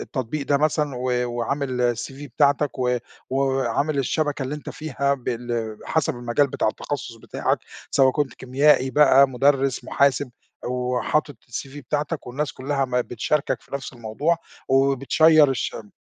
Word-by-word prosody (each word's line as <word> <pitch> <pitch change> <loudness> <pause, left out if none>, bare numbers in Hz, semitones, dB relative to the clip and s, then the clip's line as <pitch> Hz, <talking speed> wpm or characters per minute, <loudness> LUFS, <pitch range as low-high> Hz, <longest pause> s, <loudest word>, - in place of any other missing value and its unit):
التطبيق 140 +1 -4
ده 140 - +3
مثلًا 150 -3 0
و 125 -1 0
وعامل 125 0 -1
الCV 135 +5 -7
بتاعتك 145 -1 +2
و 125 -1 +1 0.4
و 130 - -1
وعامل 135 +2 0
الشبكة 145 +1 0
اللي 130 +3 -3
أنت 150 - -7
فيها 140 -2 -1
بال 120 -3 -4
حسب 160 -1 0
المجال 120 +4 +1
بتاع 130 - -1
التخصص 130 +1 -4
بتاعك، - - -1 0.3
سواء 135 -1 +5
كنت 145 -3 -1
كيميائي 130 0 +3
بقى، 140 -2 +6
مدرس، 135 +1 +1
محاسب 140 -1 +2 0.3
أو 125 0 -1
حاطط 150 -3 0
الCV 135 +3 -6
بتاعتك 150 +3 -3
والناس 140 +4 -3
كلّها 140 +1 -1
ما 125 -1 0
بتشاركك 125 +5 -1
في - - -24
نفس 140 - -5
الموضوع 120 +8 -1 0.3
وبتشيَّر 140 +3 +4
الشم 110 -4 -4
135 Hz, 145 wpm, -23 LUFS, 125-145 Hz, 0.4 s, بقى